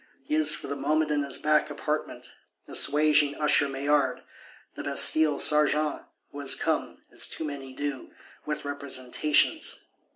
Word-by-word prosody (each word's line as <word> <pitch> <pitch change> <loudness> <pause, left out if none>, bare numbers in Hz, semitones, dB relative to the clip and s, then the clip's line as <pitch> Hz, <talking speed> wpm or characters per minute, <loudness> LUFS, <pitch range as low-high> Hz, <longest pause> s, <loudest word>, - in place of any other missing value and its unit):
He 145 - -6
is, 155 0 +4
for - - -7
the 140 - -5
moment, 150 +3 -1
in 145 -1 0
his 140 -2 -3
back 150 0 +1
apartment; 150 +1 -5 0.4
assuaging 150 -1 +4
Usher 150 -1 +2
Maillard, 135 -1 -1 0.5
the - - -8
Bastille 155 -2 +4
serjeant, 150 0 +2 0.3
who 145 - -9
has 140 -1 +1
come, - - -3
as - - -3
too - - -7
many 140 -3 -7
do, 145 0 -5 0.3
with 150 -1 -5
"representations." 140 0 -1
145 Hz, 140 wpm, -26 LUFS, 140-150 Hz, 0.5 s, is